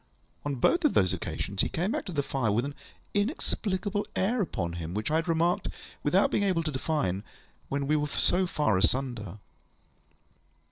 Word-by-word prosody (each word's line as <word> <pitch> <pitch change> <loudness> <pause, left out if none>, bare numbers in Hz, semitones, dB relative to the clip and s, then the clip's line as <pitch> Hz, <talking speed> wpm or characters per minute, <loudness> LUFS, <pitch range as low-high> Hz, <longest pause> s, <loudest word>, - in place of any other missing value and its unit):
On 145 -1 -1
both 340 - +3
of 300 - +3
those 95 -1 +4
occasions, 95 +2 -2
he - - +1
came 180 +6 -1
back - - -2
to 190 - -5
the 145 -4 0
fire 130 -6 0
with 115 +5 +1
the 145 - -4 0.4
inexplicable 205 - -1
air 220 +5 +2
upon 85 - -2
him 85 +1 -5
which 110 +7 -1
I 155 - +4
had 165 +2 -1
remarked, 170 +1 +2 0.3
without 185 +7 +3
being - - +2
able 185 -4 +2
to 155 - -2
define, 130 - -1 0.5
when 140 0 -1
we 150 +2 +2
were 150 -1 +1
so 180 +5 +3
far 110 - +2
asunder. 110 -3 0
150 Hz, 180 wpm, -29 LUFS, -, 0.5 s, those